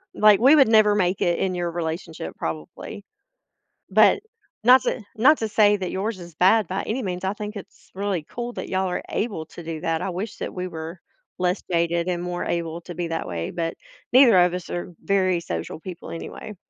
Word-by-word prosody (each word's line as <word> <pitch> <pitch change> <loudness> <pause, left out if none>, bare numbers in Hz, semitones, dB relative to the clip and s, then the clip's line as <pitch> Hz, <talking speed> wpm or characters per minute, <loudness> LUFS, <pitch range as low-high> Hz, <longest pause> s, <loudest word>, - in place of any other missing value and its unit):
like, 210 -2 +6
we 270 +6 +7
would 275 -5 +6
never 215 -2 +5
make 185 -2 +1
it 175 -1 +2
in 185 -1 0
your 175 -1 -2
relationship 165 - -5
probably. 80 - -6 0.9
But 415 - +5 0.4
not 250 +2 +7
to - - -1 0.2
not 275 +8 +5
to 220 - -2
say 210 -1 +4
that 185 -3 -4
yours 200 +2 -2
is 170 -2 -11
bad 195 +5 +4
by 190 +2 -2
any 250 +4 -3
means. 180 -1 -4
I 190 - 0
think 210 0 -6
it's 200 - -12
really 195 -5 -2
cool 240 0 -5
that - - -5
y'all 190 0 0
are 180 - -2
able 200 -8 -2
to 170 - -11
do 160 -1 -5
that, 165 -2 -1
I 195 - -2
wish 195 +5 -5
that - - -4
we 180 0 -3
were 165 +1 -7 0.4
less 180 +1 0
jaded 170 +1 +1
and 175 -1 -1
more 180 0 -3
able 170 0 -2
to 175 - -8
be 175 0 -3
that 165 0 -3
way, 85 -1 -3
but 165 -1 -2 0.4
neither 250 -6 +7
of 180 0 +4
us 180 -1 -5
are 175 0 -4
very 185 -3 +2
social 85 - -5
people 180 -1 -8
anyway. 205 +5 -7
180 Hz, 210 wpm, -24 LUFS, 170-210 Hz, 0.9 s, we